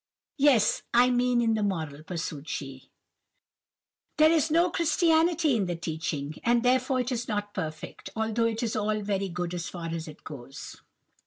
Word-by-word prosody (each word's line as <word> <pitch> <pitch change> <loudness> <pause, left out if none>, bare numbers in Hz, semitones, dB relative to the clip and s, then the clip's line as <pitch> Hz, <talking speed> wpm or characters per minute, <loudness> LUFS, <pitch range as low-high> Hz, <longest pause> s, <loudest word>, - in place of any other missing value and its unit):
"Yes; 265 -7 +4
I 250 +1 +6
mean 245 0 +2
in 225 -1 +2
the 220 - 0
moral:" 160 -8 -2
pursued 155 -3 -5
she, 135 -2 -6 1.3
"there 310 +1 +6
is 320 -1 +2
no 340 +3 +3
Christianity 330 -2 +3
in 200 -5 0
the 175 - -2
teaching, 155 -3 -4
and 235 0 +3
therefore 255 +1 +2
it 250 +1 -3
is 235 -1 -2
not 205 -1 -3
perfect, 155 -6 -6
although 220 +1 0
it 225 +1 -2
is 225 - -1
all 215 0 0
very 200 -1 -1
good 175 0 -3
as 170 -1 -4
far 170 -2 -6
as 165 0 -4
it 155 - -12
goes." 135 -3 -9
215 Hz, 170 wpm, -28 LUFS, 165-250 Hz, 1.3 s, I